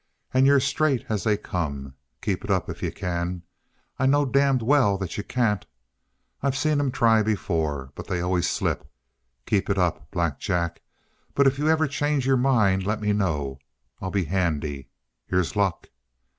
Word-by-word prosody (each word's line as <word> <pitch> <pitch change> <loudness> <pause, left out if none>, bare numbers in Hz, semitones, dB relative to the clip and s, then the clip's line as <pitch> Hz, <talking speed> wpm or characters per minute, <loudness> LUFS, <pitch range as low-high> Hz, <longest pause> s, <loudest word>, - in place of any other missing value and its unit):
"And 130 +1 +5
you're 140 0 +6
straight 140 -1 +1
as 105 -3 -1
they 105 -2 +2
come. 70 -10 -4 0.3
Keep - - -1
it - - -9
up - - +1
if - - -10
you - - -1
can. 90 0 -3 0.6
I 130 - +3
know 145 +1 +4
damned 135 -2 +2
well 125 -6 +4
that 95 -3 -5
you 105 - -3
can't. 110 -4 0 0.8
I've 140 -1 0
seen 150 0 +2
'em 145 -2 +1
try 115 -2 +4
before. 80 -10 -1
But - - -9
they 90 - -1
always 90 0 +1
slip. - - -2 0.6
Keep 105 -3 0
it 100 - +1
up, 90 -3 0
Black 85 -5 -1
Jack, 85 -4 -1 0.5
but 140 - +4
if 135 0 +3
you 150 - +1
ever 160 0 +3
change 145 -1 0
your 135 0 +4
mind, 110 -8 +3
lemme 105 +1 0
know. 75 -9 -1 0.4
I'll 95 - -3
be 95 0 0
handy. 75 -6 -1 0.4
Here's 90 +1 0
luck!" 100 -4 0
105 Hz, 170 wpm, -25 LUFS, 85-135 Hz, 0.8 s, you're